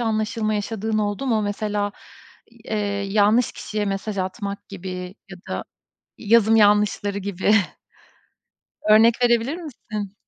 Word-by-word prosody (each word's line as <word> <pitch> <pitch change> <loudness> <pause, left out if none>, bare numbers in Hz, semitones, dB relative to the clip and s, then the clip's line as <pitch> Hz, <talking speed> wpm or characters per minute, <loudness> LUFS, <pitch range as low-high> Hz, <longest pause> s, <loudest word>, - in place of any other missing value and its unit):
anlaşılma 215 -1 -1
yaşadığın 215 +1 -2
oldu 205 +5 -2
mu? 225 -4 +1
Mesela 205 0 -2 0.5
i 235 - -23
eee, 215 - 0 0.3
yanlış 215 +3 +3
kişiye 210 -1 -4
mesaj 195 +1 -3
atmak 200 +2 -4
gibi 185 -1 -7 0.2
ya 195 - -8
da - - -3 0.5
yazım 225 0 +4
yanlışları 205 -1 +3
gibi. 200 0 0 1.4
Örnek 220 +2 +7
verebilir 240 +4 +2
misin? 215 - -7
210 Hz, 115 wpm, -22 LUFS, 200-225 Hz, 1.4 s, Örnek